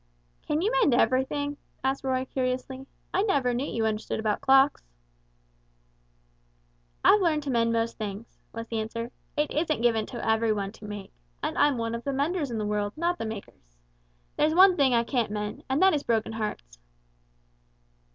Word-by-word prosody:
"Can 300 +3 0
you 430 - +2
mend - - +3
everything?" 265 +4 +1 0.3
asked 265 +1 0
Roy, 260 -1 0
curiously; 260 +1 -3 0.3
"I - - +2
never 280 - +1
knew 255 +4 -1
you 225 -1 -1
understood 215 0 -2
about 215 -1 -1
clocks." 270 +1 +4 2.2
"I've 420 - +6
learned 310 -4 +1
to 280 - -2
mend 230 -1 +2
most 230 0 -1
things," 210 +1 -6
was 230 0 -6
the 225 -1 -3
answer; 230 +2 -4 0.3
"it 295 0 +1
isn't 310 -5 0
given 225 -3 +2
to 240 - -6
every 220 0 +2
one 200 -2 -3
to 215 - -13
make, 205 -1 -8 0.3
and - - -1
I'm 290 -3 +3
one 230 0 -2
of 235 0 -4
the 280 - -2
menders 290 +2 -1
in 230 - -3
the 215 - -2
world 210 0 -1
not 345 +2 0
the - - -3
makers. 130 - -10 0.6
There's 310 +1 +2
one 375 0 +7
thing 270 -6 +3
I 235 - +3
can't 235 -2 -1
mend 210 0 -4
and 265 +2 +1
that 380 -1 +6
is 295 - +1
broken 225 -3 0
hearts." 210 - -5
245 Hz, 180 wpm, -27 LUFS, 220-285 Hz, 2.2 s, one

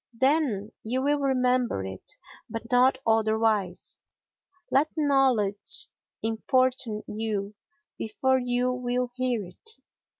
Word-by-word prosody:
Then 260 -7 +2
you 255 +4 -1
will 290 +1 +2
remember 255 - +1
it, 95 0 -6 0.3
but 225 +1 -6
not 255 +2 +5
otherwise. 220 -4 +1 0.7
Let 290 +4 +3
knowledge 260 -9 +2 0.3
importune 230 0 0
you 210 -2 -3 0.5
before 260 +4 +1
you 245 0 0
will 250 0 -2
hear 250 -5 -1
it. 440 - -12
245 Hz, 100 wpm, -27 LUFS, 215-260 Hz, 0.7 s, not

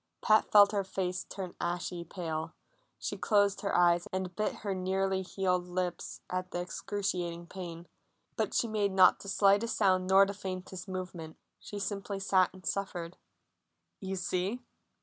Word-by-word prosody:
Pat 215 -1 +3
felt 205 -1 +8
her 200 -2 0
face 185 -1 -3
turn 185 -3 -6
ashy 175 0 -2
pale; 160 -3 -4 0.4
she - - -4
closed 205 -2 +3
her 200 - 0
eyes 175 0 +4
and 185 -1 -3
bit 215 - -1
her 200 - 0
nearly 190 +1 0
healed 180 -1 -1
lips 180 -1 -3
at 185 0 -3
the 175 - -3
excruciating 180 -2 -3
pain, 170 -2 -8 0.5
but - - -1
she 235 - +2
made 210 -2 0
not 190 -1 +6
the 200 - -8
slightest 200 +3 +3
sound 185 -3 +3
nor 195 +1 +7
the 200 - -4
faintest 185 -1 -6
movement. 180 -4 -6 0.2
She 205 - -8
simply 200 0 -3
sat 190 -1 +3
and 185 0 -15
suffered. 180 -3 -3 0.8
"You 190 0 -4
see!" 185 +5 -1
185 Hz, 155 wpm, -31 LUFS, 180-200 Hz, 0.8 s, felt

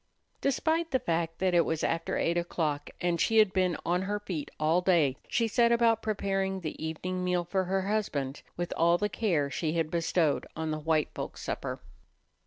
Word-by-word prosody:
Despite 320 +4 +1
the 265 - +2
fact 165 -7 -1
that 185 -1 +1
it 170 -1 +5
was 160 -1 -2
after 165 0 0
eight 170 - +1
o'clock 160 -4 -1
and 175 -1 +1
she 225 - +2
had 215 -3 +5
been 185 -3 +1
on 175 +1 +1
her 205 +2 -2
feet 175 -8 -5
all 160 +4 +3
day, 165 -8 +3
she 230 -1 +1
set 235 +2 +3
about 230 -1 +3
preparing 195 -3 -1
the 155 -1 -5
evening 180 +3 -3
meal 180 -1 +1
for 190 +2 0
her 190 +1 0
husband 155 -10 -2 0.2
with 175 0 -2
all 170 +1 +4
the 210 +3 0
care 165 -10 0
she 155 +1 -1
had 165 -2 -1
bestowed 165 -2 +1
on 160 -1 -2
the 155 - -2
white 155 0 0
folks' - - -6
supper. - - -4
175 Hz, 195 wpm, -29 LUFS, 160-200 Hz, 0.2 s, it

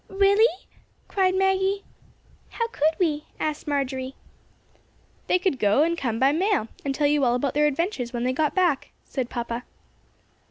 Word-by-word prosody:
"Really?" 400 +1 +3 0.4
cried 375 -1 +1
Maggie. 385 +1 +1 0.7
"How 465 - -2
could 315 -6 +1
we?" 305 -4 0
asked 305 -1 -3
Marjory. 265 -2 -2 1.1
"They - - +4
could 360 -7 -1
go 210 +8 +4
and 335 +1 +1
come 240 -8 -2
by 265 +3 +4
mail, 350 - +1
and 275 -1 -2
tell 295 - +1
you 290 -1 +3
all 240 -1 +3
about 260 +2 -1
their 300 +1 +3
adventures 290 - -2
when 240 -1 -3
they 255 +1 +1
got 300 +2 0
back," 350 -7 +1 0.2
said 255 -3 -3
papa. 235 0 -4
295 Hz, 160 wpm, -25 LUFS, 260-375 Hz, 1.1 s, They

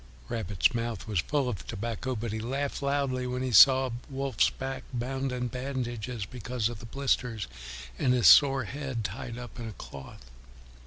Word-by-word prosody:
Rabbit's 105 0 +1
mouth 115 -4 -3
was 105 -5 0
full 140 - 0
of 105 -8 -4
tobacco, 120 +4 -3
but 115 -1 -3
he 110 - -2
laughed 135 +6 -2
loudly 140 -2 0
when 125 +1 -2
he 130 - -1
saw 130 +4 +7 0.2
Wolf's 135 -3 +1
back 135 0 -5
bound 130 +2 -2
in 125 -1 -2
bandages 125 -3 -4
because 120 +1 -2
of 120 -3 -7
the 115 - -9
blisters, 125 -5 -1 0.5
and 125 - +3
his 125 -2 +2
sore 135 -2 +8
head 130 -1 -4
tied 115 +4 -5
up 120 -1 -9
in 115 - -5
a - - -8
cloth. 70 -6 -10
125 Hz, 170 wpm, -29 LUFS, 115-135 Hz, 0.5 s, sore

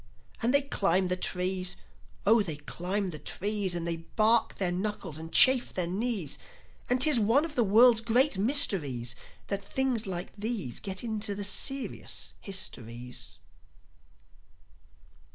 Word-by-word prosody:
And 235 - +1
they 280 +1 +5
climb 190 -8 +1
the 180 - +1
trees. 185 0 -1 0.5
Oh, 220 +2 +5
they 165 -7 -3
climb 185 +6 -3
the 155 - -7
trees! 200 -2 -1
And 170 -1 -3
they 170 -1 -2
bark 215 +7 +1
their 185 -3 0
knuckles, 180 -4 -3
and 165 +1 -9
chafe 260 -1 +5
their 180 - 0
knees; 195 - -3 0.5
And 250 +1 +3
'tis 285 -2 +6
one 230 +8 +3
of 325 - -7
the 245 - +2
world's 225 +3 +5
great 240 +4 +2
mysteries 180 - +2 0.3
That 200 0 -4
things 250 0 -1
like 180 -2 -5
these 205 - -4
Get 195 +1 -4
into 215 -3 -2
the 205 - -5
serious 270 +7 -2
histories. 125 - -6
200 Hz, 140 wpm, -28 LUFS, 180-235 Hz, 0.5 s, tis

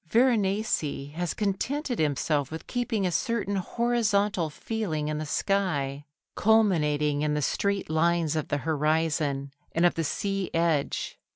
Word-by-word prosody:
Veronese 205 - +1
has 175 +1 -2
contented 245 +6 -1
himself 145 -1 +1
with 160 +1 -7
keeping 240 -5 -1
a 180 - +1
certain 205 +1 -1
horizontal 210 -4 +1
feeling 155 -4 -3
in 150 0 -2
the 155 - -4
sky, 145 -7 0 0.3
culminating 150 -9 +2
in 150 0 +1
the 150 - 0
straight 200 +8 0
lines 160 0 +1
of 155 - -1
the 145 - 0
horizon 150 -2 0 0.2
and 165 +2 +3
of 175 - +4
the 165 - -1
sea 195 +4 -2
edge. 165 -4 0
170 Hz, 135 wpm, -27 LUFS, 150-205 Hz, 0.3 s, of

